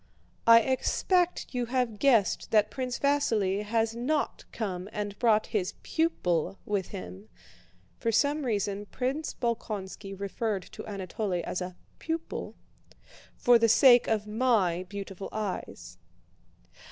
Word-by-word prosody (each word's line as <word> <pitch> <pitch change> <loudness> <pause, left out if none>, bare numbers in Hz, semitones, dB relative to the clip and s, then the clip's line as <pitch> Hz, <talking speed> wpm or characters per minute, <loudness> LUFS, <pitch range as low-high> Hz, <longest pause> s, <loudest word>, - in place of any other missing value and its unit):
"I 230 0 +9
expect 350 - 0
you 245 -1 -1
have 245 -4 -1
guessed 235 -8 +3
that 210 -1 +3
Prince 255 -2 -3
Vasíli 225 -9 +1
has 225 +1 0
not 285 +6 -1
come 190 -4 -4
and 205 -1 -4
brought 220 -3 +3
his 190 -4 -1
pupil 195 - 0
with 200 -3 -1
him" 90 +4 -9 0.7
(for 230 - 0
some 285 +6 +2
reason 205 -3 -1
Prince 265 +7 -3
Bolkónski 200 -4 -4
referred 200 0 -2
to - - -10
Anatole 190 -2 -3
as 180 - -3
a 180 0 -5 0.2
"pupil") 325 0 -4 0.8
"for 245 -1 +5
the 230 0 +4
sake 245 +1 +7
of 215 -2 0
my 210 -6 +2
beautiful 195 -1 -6
eyes. 210 -3 -5
215 Hz, 125 wpm, -29 LUFS, 195-250 Hz, 0.8 s, I